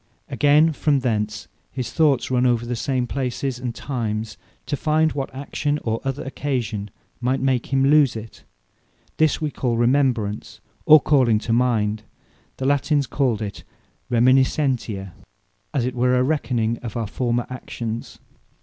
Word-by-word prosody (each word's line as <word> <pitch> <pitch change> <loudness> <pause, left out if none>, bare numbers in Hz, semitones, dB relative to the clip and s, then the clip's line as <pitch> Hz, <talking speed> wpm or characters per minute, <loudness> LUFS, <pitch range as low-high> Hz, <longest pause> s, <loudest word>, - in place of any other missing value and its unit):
Again, 150 +2 +4
from 145 -2 +1
thence, 105 -4 -2 0.2
his 125 -3 -4
thoughts 145 -4 +2
run 125 -1 +2
over 120 -1 +1
the 120 +1 -3
same 125 +1 -1
places 130 0 -3
and 125 -2 -4
times, 110 -5 -3 0.3
to - - -2
find 155 +2 +2
what 135 -2 -3
action, 145 +2 -2
or 115 0 -2
other 135 0 -3
occasion 125 -7 -3 0.3
might 130 +2 0
make 130 -2 0
him 135 0 +3
lose 145 -3 +4
it. 110 0 -9 0.7
This 155 -1 +2
we 155 -2 -2
call 120 -4 -1
Remembrance, 120 -4 0 0.3
or 155 0 +9
Calling 130 -7 +3
to 115 - -1
mind: 110 -3 +1 0.6
the 130 - -3
Latines 145 +1 +2
call 125 -6 0
it 100 - -6 0.5
Reminiscentia, 125 -4 +2 0.6
as 135 -5 0
it 125 - -2
were 125 +1 +2
a 125 - +3
Re 150 +3 +1
Conning 115 -3 -1
of 115 -2 -6
our 115 - -1
former 120 +2 -1
actions. 115 -2 -6
125 Hz, 150 wpm, -22 LUFS, 115-140 Hz, 0.7 s, or